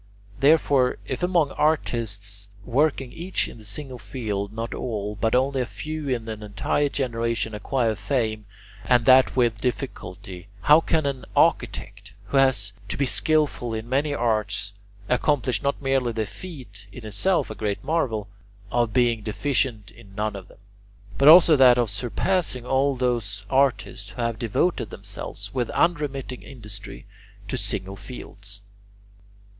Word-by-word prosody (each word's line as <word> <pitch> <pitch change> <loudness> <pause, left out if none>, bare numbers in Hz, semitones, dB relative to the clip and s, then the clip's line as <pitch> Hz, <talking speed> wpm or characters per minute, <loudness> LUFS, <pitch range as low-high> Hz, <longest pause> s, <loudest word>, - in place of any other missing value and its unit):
Therefore, 140 -3 +4
if 130 - -4
among 175 -5 +2
artists 105 -9 -1 0.2
working 135 0 +1
each 180 +3 -1
in - - -11
a - - -15
single 125 +4 -6
field 105 -2 -4
not 115 +2 -4
all, 105 -4 -3
but 110 +3 +1
only 135 +1 +2
a - - 0
few 155 0 -5
in 120 -3 -2
an 110 -1 -5
entire 105 +8 0
generation 115 -4 -1
acquire 115 +2 0
fame, 110 0 -2 0.4
and 120 -2 +3
that 130 0 +6
with 120 -3 +2
difficulty, 95 -8 -5
how 150 +2 +6
can 160 -2 +1
an 135 -2 -3
architect, 100 +2 +1 0.2
who 140 - +1
has 125 -8 +3 0.2
to - - -3
be 140 - +2
skilful 140 -4 +1
in 110 +1 -5
many 140 +4 +1
arts, 105 -5 -1 0.3
accomplish 125 -2 +1
not 140 0 -1
merely 135 -3 +1
the 110 -1 -2
feat 120 - -10
in 115 +2 -10
itself 170 - 0
a - - -3
great 105 -2 -3
marvel 120 -11 -1 0.4
of 120 -3 +1
being 120 -3 +2
deficient 110 -1 -1
in 105 -3 -16
none 105 0 -2
of 95 -2 -8
them, - - -18 0.6
but 140 - +5
also 165 0 +9
that 130 -3 +7
of 120 -4 +1
surpassing 125 - -1
all 135 +2 +2
those 115 -6 -1
artists 130 -6 +1
who 120 +6 -6
have 115 -1 -2
devoted 120 - 0
themselves 100 0 -6
with 125 -3 -1
unremitting 145 -6 -1
industry 105 -6 -8 0.4
to - - -3
single 95 +1 -2
fields? 100 -3 -8
120 Hz, 150 wpm, -24 LUFS, 105-135 Hz, 0.6 s, also